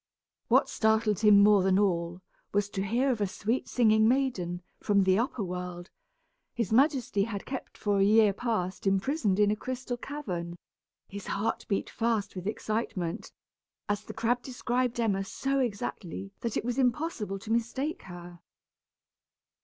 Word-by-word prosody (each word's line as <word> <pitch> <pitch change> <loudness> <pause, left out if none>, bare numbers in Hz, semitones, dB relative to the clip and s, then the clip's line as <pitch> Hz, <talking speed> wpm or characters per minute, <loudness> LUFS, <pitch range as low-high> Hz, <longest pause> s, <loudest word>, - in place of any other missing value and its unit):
What - - +4
startled 220 -2 +2
him 210 -2 +7
more 205 -1 +6
than 190 0 +3
all, 175 -3 0 0.3
was 205 0 +1
to 195 - -2
hear 240 +7 +1
of 230 -4 -2
a 205 - +2
sweet 225 +6 -2
singing 220 -2 +4
maiden, 210 -10 0 0.2
from 200 -1 +3
the 190 +1 +3
upper 235 -2 -1
world, 180 -1 -6 0.6
his 230 -5 -2
majesty 255 -6 +3
had 205 -3 -5
kept 265 -1 -6
for 205 -1 0
a - - +5
year 210 0 +5
past 200 -4 -2
imprisoned 200 +1 +1
in 205 0 +4
a - - +1
crystal 255 +2 -4
cavern! 185 -12 -5 0.5
His 200 -1 -8
heart 205 +3 -2
beat 200 - -1
fast 225 -4 -1
with 185 +1 -5
excitement, 215 -4 -3 0.6
as 205 0 -1
the - - -9
crab 235 +2 +1
described 245 -1 -2
Emma 200 -4 +1
so 275 +7 -1
exactly 200 -5 -3
that 230 -2 -2
it - - -2
was 245 +2 -1
impossible 245 - 0
to 215 +3 -7
mistake 260 +6 -1
her. 175 -1 -10
210 Hz, 155 wpm, -29 LUFS, 195-240 Hz, 0.6 s, him